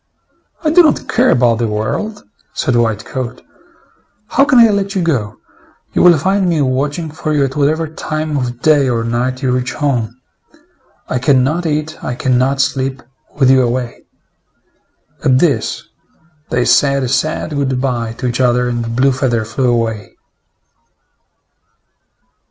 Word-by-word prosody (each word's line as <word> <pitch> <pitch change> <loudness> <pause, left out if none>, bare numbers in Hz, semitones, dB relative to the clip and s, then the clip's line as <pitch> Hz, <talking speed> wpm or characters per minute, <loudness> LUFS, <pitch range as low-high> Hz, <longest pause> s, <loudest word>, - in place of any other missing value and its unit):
"I 310 - +2
do 355 +3 +7
not 310 -3 +1
care 255 +2 +2
about 120 -2 +3
the 120 - 0
world," 110 - -3 0.3
said 130 - 0
White 110 -3 0
coat. 125 -1 -6 0.9
"How 275 - +3
can 260 - +3
I 230 -1 +7
let 200 -1 -1
you 185 - 0
go! 115 -11 -1 0.6
You - - +2
will 175 -2 +6
find 190 +4 +1
me 165 -3 +1
watching 145 +5 -2
for 155 0 -3
you 145 -2 +2
at 135 0 -5
whatever 155 +3 +1
time 155 -1 -4
of 125 -3 -3
day 145 -4 +4
or 115 -2 0
night 125 +3 -2
you 130 - +1
reach 125 0 -1
home. 125 -5 -2 0.9
I 125 - -1
can 130 0 +3
not 165 +6 -1
eat, 155 0 -3
I 125 - -3
can 125 0 +1
not 135 +2 0
sleep, 135 -1 -2 0.3
with 135 -3 +4
you 130 -1 +5
away." 120 0 -2 1.2
At 130 -1 +3
this, 135 -7 0 0.7
they 120 0 0
said. 140 -1 +3
a - - -1
sad 135 +5 -1
good 135 -3 -1
by 120 -4 -2
to 125 - -7
each 125 +1 -1
other, 125 0 +2
and 120 -1 -3
Blue 135 +2 +3
feather 125 -4 -1
flew 125 +3 -1
away. 110 -3 -2
130 Hz, 160 wpm, -15 LUFS, 120-155 Hz, 1.2 s, do